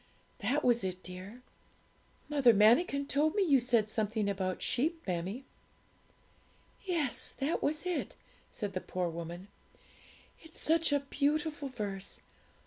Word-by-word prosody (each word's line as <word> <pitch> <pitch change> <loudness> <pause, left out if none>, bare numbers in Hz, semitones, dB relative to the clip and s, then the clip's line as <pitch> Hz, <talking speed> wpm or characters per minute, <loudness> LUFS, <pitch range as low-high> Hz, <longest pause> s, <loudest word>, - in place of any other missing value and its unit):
That 255 +7 0
was 240 -3 +3
it, 185 -1 -4
dear.' 185 +7 -9 0.8
'Mother 270 -6 +5
Manikin 280 - +4
told 300 +4 +1
me 410 - +3
you 285 -7 +5
said 235 -3 +2
something 215 -1 -1
about 190 -2 -1
sheep, 315 +7 0
mammie.' 185 +8 -3 1.4
'Yes, 335 -9 -1
that 285 +5 -1
was 305 +4 0
it,' 360 -2 -2 0.3
said 205 -4 -4
the 185 - -2
poor 180 -1 -2
woman; 170 +3 -7 0.9
'it's 320 0 -10
such 325 0 +2
a 285 -1 +3
beautiful 295 +1 -1
verse! 200 -6 -5
245 Hz, 130 wpm, -32 LUFS, 195-295 Hz, 1.4 s, Mother